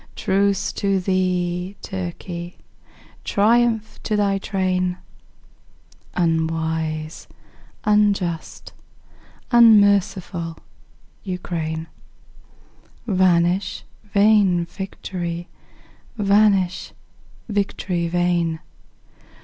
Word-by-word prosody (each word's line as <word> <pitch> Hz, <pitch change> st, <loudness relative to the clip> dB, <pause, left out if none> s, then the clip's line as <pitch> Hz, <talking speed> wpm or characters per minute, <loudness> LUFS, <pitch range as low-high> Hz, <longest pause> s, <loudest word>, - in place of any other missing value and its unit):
Truce 200 Hz, -1 st, +1 dB
to 195 Hz, -1 st, 0 dB
thee, 180 Hz, 0 st, -1 dB
Turkey! 175 Hz, -1 st, -6 dB, 0.7 s
Triumph 225 Hz, +1 st, +1 dB
to 215 Hz, -, -1 dB
thy 200 Hz, -1 st, +1 dB
train, 185 Hz, -2 st, -1 dB, 1.2 s
Unwise, 160 Hz, -2 st, -1 dB, 0.6 s
unjust, 200 Hz, -5 st, 0 dB, 0.8 s
unmerciful 200 Hz, -7 st, +4 dB, 0.7 s
Ukraine! 165 Hz, -4 st, -4 dB, 1.2 s
Vanish 185 Hz, -2 st, +2 dB, 0.2 s
vain 200 Hz, -4 st, +3 dB
victory! 175 Hz, -2 st, -6 dB, 0.7 s
vanish, 200 Hz, -3 st, +2 dB, 0.5 s
victory 195 Hz, -4 st, -1 dB
vain! 170 Hz, -2 st, 0 dB
185 Hz, 55 wpm, -22 LUFS, 170-200 Hz, 1.2 s, unmerciful